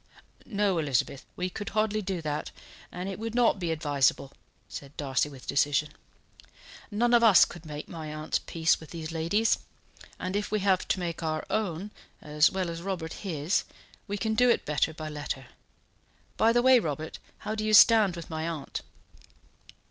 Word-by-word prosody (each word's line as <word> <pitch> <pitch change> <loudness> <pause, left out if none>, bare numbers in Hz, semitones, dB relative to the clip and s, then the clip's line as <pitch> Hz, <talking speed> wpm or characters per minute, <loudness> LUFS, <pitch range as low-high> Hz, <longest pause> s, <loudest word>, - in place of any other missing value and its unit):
"No, 200 -5 +1
Elizabeth, 140 -1 -1
we 180 - -2
could 205 +2 -5
hardly 215 0 +2
do 185 -4 -3
that, 150 -1 -3 0.4
and 180 +2 -5
it 195 0 -5
would 225 +1 -4
not 240 -4 +3
be 175 -2 -2
advisable," 145 -3 +1 0.4
said 140 0 -9
Darcy, 140 0 0
with 135 -3 -12
decision. 145 +2 +1 1.0
"None 235 +3 +1
of 235 -1 +6
us 215 -6 +8
could 170 -2 -11
make 150 0 -7
my 160 -2 -7
aunt's 155 0 -2
peace 160 -1 +1
with 160 - -12
these 165 -1 -6
ladies; 170 +8 +1 0.6
and 185 +1 -4
if 205 0 -1
we 215 -1 0
have 190 -2 +2
to - - 0
make 170 -2 -4
our 155 -1 -2
own, 205 -2 -2 0.3
as 150 +1 +3
well 185 -3 -2
as 165 0 -6
Robert 175 -4 -4
his, 165 -3 -1 0.4
we 205 0 -3
can 220 +1 -1
do 245 +3 +4
it 235 - +2
better 150 +2 +1
by 155 0 -7
letter. 145 -3 -5 0.9
By 225 - +4
the 240 +1 +3
way, 260 -1 +7
Robert, 155 -4 -4 0.3
how 215 - -1
do 215 0 -3
you 215 0 +4
stand 215 -5 +7
with 170 -2 -8
my 160 0 -3
aunt?" 155 -4 -5
170 Hz, 180 wpm, -28 LUFS, 155-210 Hz, 1.0 s, us